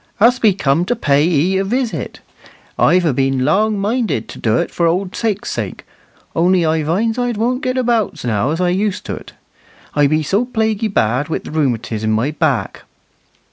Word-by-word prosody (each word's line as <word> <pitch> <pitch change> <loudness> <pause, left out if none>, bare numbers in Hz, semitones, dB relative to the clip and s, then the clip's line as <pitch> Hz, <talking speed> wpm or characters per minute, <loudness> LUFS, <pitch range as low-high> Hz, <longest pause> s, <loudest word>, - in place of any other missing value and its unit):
"Us 245 +4 +5
be 215 -5 +4
cum 150 -2 +1
to 245 - 0
pay 145 -9 +2
'ee 175 +3 +2
a - - +1
visit. 240 +4 -3 0.6
I've 180 -1 +4
a 155 - +2
been 135 0 +1
long 210 +8 +2
minded 210 - -1
to - - -9
do't 110 +1 0
for 170 - +1
old 180 +3 -1
sake's 210 -3 -2
sake, - - -5 0.5
only 175 +1 +3
I 160 0 +1
vinds 215 +10 0
I 245 -1 0
dwon't 240 +4 -1
get 255 0 -1
about 225 - 0
now 115 +2 0
as 160 +3 -2
I'd 180 -1 +2
used 195 +2 -1
to't. - - -7 0.6
I 145 -1 +3
be 155 +2 +1
so 200 +9 +1
plaguy 220 -3 0
bad 130 - 0
wi' - - 0
th' - - -10
rheumatiz 120 -7 -1
in 110 0 +1
my 115 +7 0
back." 155 -5 -1
180 Hz, 185 wpm, -17 LUFS, 145-220 Hz, 0.6 s, Us